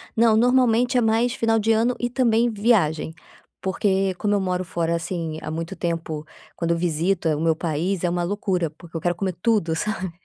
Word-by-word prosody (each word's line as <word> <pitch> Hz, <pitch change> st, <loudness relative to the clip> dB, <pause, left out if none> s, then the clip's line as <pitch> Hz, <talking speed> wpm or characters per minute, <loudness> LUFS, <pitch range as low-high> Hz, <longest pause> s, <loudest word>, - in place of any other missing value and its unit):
Não, 225 Hz, -1 st, +4 dB
normalmente 250 Hz, +1 st, +3 dB
é -, -, +4 dB
mais 230 Hz, +2 st, +2 dB
final 225 Hz, -2 st, +1 dB
de 220 Hz, +1 st, +1 dB
ano 230 Hz, +3 st, +2 dB
e 240 Hz, -, 0 dB
também 240 Hz, -2 st, +2 dB
viagem, 190 Hz, -8 st, +1 dB, 0.4 s
porque 190 Hz, 0 st, 0 dB
como 205 Hz, +2 st, 0 dB
eu 200 Hz, -, +2 dB
moro 185 Hz, -1 st, -1 dB
fora, 170 Hz, -1 st, -1 dB
assim, 165 Hz, -2 st, -4 dB
há -, -, -6 dB
muito 165 Hz, +4 st, -4 dB
tempo, 165 Hz, -3 st, -3 dB, 0.3 s
quando 170 Hz, -1 st, -1 dB
eu 170 Hz, -, +1 dB
visito 170 Hz, +1 st, 0 dB
o 155 Hz, -1 st, 0 dB
meu 165 Hz, -1 st, +2 dB
país, 170 Hz, +3 st, -2 dB
é 175 Hz, -, +2 dB
uma 175 Hz, 0 st, -1 dB
loucura, 180 Hz, -2 st, -1 dB
porque 165 Hz, +2 st, -16 dB
eu 165 Hz, -, -2 dB
quero 175 Hz, +1 st, 0 dB
comer 185 Hz, +1 st, -2 dB
tudo, 205 Hz, -8 st, +1 dB
sabe, 185 Hz, +1 st, -3 dB
185 Hz, 200 wpm, -23 LUFS, 165-225 Hz, 0.4 s, Não